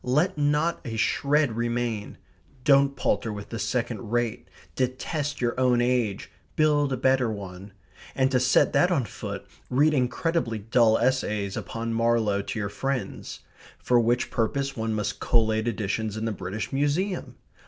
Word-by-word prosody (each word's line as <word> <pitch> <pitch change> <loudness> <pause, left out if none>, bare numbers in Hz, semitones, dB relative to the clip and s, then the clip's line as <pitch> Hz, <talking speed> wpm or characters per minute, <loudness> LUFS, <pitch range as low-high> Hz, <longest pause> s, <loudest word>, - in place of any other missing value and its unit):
Let 150 +9 +1
not 150 +3 +1
a 115 - -5
shred 140 +3 +1
remain. 120 -2 -2 0.5
Don't 140 0 +4
palter 115 - 0
with 100 -1 -7
the 115 - -5
second 115 0 -2
rate. 120 0 -1 0.3
Detest 140 +4 -2
your 120 -1 +1
own 125 -2 +3
age. 120 -5 0 0.2
Build 150 -2 +3
a 130 - 0
better 130 -1 +2
one. 100 -1 -8 0.4
And 130 0 +2
to 130 - +3
set 130 +1 +3
that 180 - +4
on 150 -9 +1
foot - - -7 0.2
read 145 +5 +3
incredibly 130 -1 0
dull 110 +1 +3
essays 105 -6 0
upon 115 0 -4
Marlowe 115 -3 +2
to 100 - -5
your 100 -2 -2
friends. 135 +4 -4 0.4
For 125 -1 +2
which 120 +1 +1
purpose 135 +4 -1
one 110 -1 -2
most 105 -1 -2
collate 110 -1 +2
editions 110 -1 -2
in 110 - -3
the 115 - 0
British 100 +3 -5
Museum. 150 +8 -1
120 Hz, 155 wpm, -26 LUFS, 110-135 Hz, 0.5 s, Don't